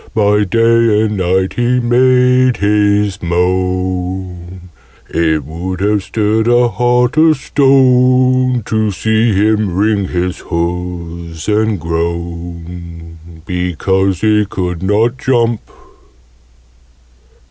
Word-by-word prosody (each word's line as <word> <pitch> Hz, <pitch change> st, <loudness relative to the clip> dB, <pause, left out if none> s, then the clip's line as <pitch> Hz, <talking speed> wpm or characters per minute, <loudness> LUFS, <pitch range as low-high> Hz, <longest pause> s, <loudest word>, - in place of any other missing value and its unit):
By 105 Hz, -1 st, +2 dB
day 115 Hz, +1 st, +2 dB
and 105 Hz, -1 st, -1 dB
night 95 Hz, +1 st, 0 dB
he 120 Hz, +1 st, 0 dB
made 125 Hz, +1 st, +3 dB
his 105 Hz, -1 st, +1 dB
moan: 90 Hz, 0 st, -3 dB, 0.4 s
It 80 Hz, -2 st, -1 dB
would 90 Hz, +4 st, -6 dB
have 105 Hz, 0 st, +1 dB
stirred 110 Hz, +2 st, -1 dB
a 120 Hz, 0 st, +3 dB
heart 125 Hz, +4 st, 0 dB
of 155 Hz, -1 st, +4 dB
stone 130 Hz, -2 st, +2 dB
To 110 Hz, -1 st, 0 dB
see 110 Hz, +3 st, 0 dB
him 105 Hz, -1 st, +1 dB
wring 100 Hz, 0 st, 0 dB
his 90 Hz, 0 st, -3 dB
hoofs 85 Hz, -1 st, -5 dB
and 110 Hz, -1 st, 0 dB
groan, 85 Hz, 0 st, -6 dB, 0.3 s
Because 90 Hz, +1 st, -1 dB
he 105 Hz, -1 st, +3 dB
could 90 Hz, -3 st, -4 dB
not 110 Hz, +6 st, 0 dB
jump. 120 Hz, -3 st, 0 dB
100 Hz, 100 wpm, -14 LUFS, 90-115 Hz, 0.4 s, of